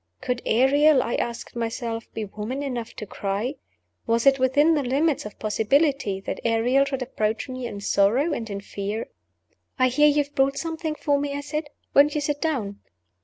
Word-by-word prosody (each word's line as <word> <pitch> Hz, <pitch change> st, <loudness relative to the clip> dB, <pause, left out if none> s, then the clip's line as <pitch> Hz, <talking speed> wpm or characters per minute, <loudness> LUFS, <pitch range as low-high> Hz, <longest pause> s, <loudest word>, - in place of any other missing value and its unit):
Could 250 Hz, -1 st, -2 dB
Ariel 270 Hz, +4 st, +4 dB
(I 235 Hz, -, -3 dB
asked 235 Hz, 0 st, -3 dB
myself) 230 Hz, 0 st, -4 dB
be 220 Hz, -, -2 dB
woman 215 Hz, +7 st, -5 dB
enough 245 Hz, -5 st, -4 dB
to 215 Hz, -, -6 dB
cry? 205 Hz, +7 st, -3 dB, 0.5 s
Was 230 Hz, +1 st, +1 dB
it 275 Hz, -1 st, +5 dB
within 285 Hz, +5 st, +4 dB
the 300 Hz, -, +2 dB
limits 275 Hz, 0 st, 0 dB
of 210 Hz, -, -13 dB
possibility 220 Hz, 0 st, +1 dB
that -, -, -4 dB
Ariel 240 Hz, +4 st, +3 dB
should 270 Hz, -2 st, -3 dB
approach 220 Hz, -2 st, -2 dB
me 255 Hz, -2 st, -5 dB
in 205 Hz, -3 st, -7 dB
sorrow 230 Hz, +11 st, +2 dB
and 225 Hz, -5 st, -4 dB
in 200 Hz, -1 st, -4 dB
fear? 205 Hz, +2 st, -4 dB, 0.7 s
"I 255 Hz, -1 st, +4 dB
hear 295 Hz, +4 st, +4 dB
you 295 Hz, 0 st, +3 dB
have 285 Hz, +1 st, -20 dB
brought 275 Hz, +1 st, +2 dB
something 320 Hz, -1 st, -3 dB
for 290 Hz, -2 st, +1 dB
me?" 285 Hz, 0 st, -2 dB
I -, -, -4 dB
said. 300 Hz, +2 st, -3 dB, 0.3 s
"Won't 290 Hz, +2 st, +5 dB
you 300 Hz, -, 0 dB
sit 290 Hz, 0 st, -2 dB
down?" 230 Hz, -11 st, -2 dB
255 Hz, 185 wpm, -24 LUFS, 225-285 Hz, 0.7 s, it